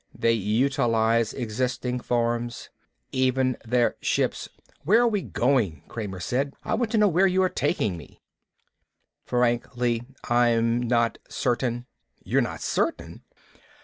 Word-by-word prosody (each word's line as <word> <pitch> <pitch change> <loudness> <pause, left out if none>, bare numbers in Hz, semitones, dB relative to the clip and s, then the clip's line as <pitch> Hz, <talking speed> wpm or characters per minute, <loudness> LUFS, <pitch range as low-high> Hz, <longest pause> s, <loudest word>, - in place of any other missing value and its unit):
They 115 - +2
utilize 115 0 +1
existing 125 +1 -2
forms. 120 0 -2 0.4
Even 130 0 +1
their 120 +1 +1
ships - - -1 0.2
" - - -33
"Where 210 +9 +5
are 240 - +4
we 210 -4 0
going?" 115 - 0
Kramer 100 -5 -6
said. 135 - -2
"I - - -2
want 230 0 0
to - - +3
know 210 -1 +5
where 190 +1 +4
you 190 0 +2
are 185 - +2
taking 105 - -1
me." 80 - -14 1.1
"Frankly, 120 -1 0 0.2
I'm 120 -1 +2
not 115 -1 +1
certain." 120 -1 -1 0.4
"You're - - +2
not - - -4
certain?" - - -2
120 Hz, 130 wpm, -25 LUFS, 115-130 Hz, 1.1 s, Where